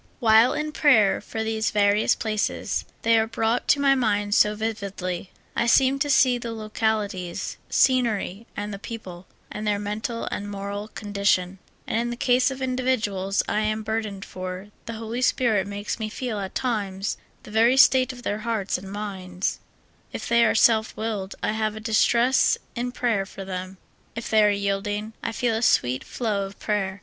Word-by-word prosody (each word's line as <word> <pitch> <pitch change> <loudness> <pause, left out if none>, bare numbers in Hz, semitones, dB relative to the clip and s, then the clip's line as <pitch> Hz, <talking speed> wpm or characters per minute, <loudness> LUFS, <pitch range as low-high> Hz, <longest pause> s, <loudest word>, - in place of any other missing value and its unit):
While 225 0 +5
in 305 0 -2
prayer 225 -11 +4
for 220 +2 -4
these 220 0 0
various 205 0 +3
places, 215 -2 -2 0.2
they 230 0 +5
are 220 - +1
brought 225 +1 0
to 285 - +4
my 275 -1 +5
mind 205 -5 +1
so 210 0 +4
vividly. 200 -4 -4 0.3
I 235 - +1
seem 265 +3 +4
to 290 +1 0
see 255 -3 +4
the 235 -1 -5
local 220 0 0
ities, 180 -3 -5
scenery, 230 -5 +1
and 205 0 -4
the 200 - -6
people 190 -6 -8 0.2
and 210 0 -4
their 205 -1 +2
mental 210 +3 -3
and 205 0 -4
moral 200 +1 -5
condition; 200 -3 0 0.3
and 225 - -1
in 240 0 -1
the 240 - -3
case 250 +1 +3
of 265 0 -5
individuals 225 -7 0
I - - 0
am 215 0 -1
burdened 215 -3 -3
for, 185 +2 -7 0.2
the 230 - -4
Holy 225 +2 -4
Spirit 225 -6 +2
makes 205 +2 -4
me 215 -1 -3
feel 230 -1 -4
at 190 -1 -6
times 200 -6 -2 0.3
the - - -12
ver}^ 230 +4 +4
state 260 -1 +6
of 245 -1 -12
their 205 -2 -2
hearts 215 -4 -1
and 190 +1 -10
minds; 190 -3 -4 0.5
if - - -5
they 235 0 +4
are 230 - +3
self 220 -1 +3
willed, 210 -3 -3
I - - +1
have 215 -1 -1
a - - -6
distress 235 +3 +3 0.2
in 245 +1 -2
prayer 230 -6 0
for 195 -1 -9
them; 185 0 -6 0.4
if 230 - -5
they 215 -1 +5
are 210 - +5
yielding, 205 +2 -2
I - - -2
feel 230 +1 0
a 220 - -1
sweet 130 - +2
flow 205 -5 -2
of 195 - -13
prayer. 200 -2 -2
215 Hz, 180 wpm, -24 LUFS, 200-235 Hz, 0.5 s, state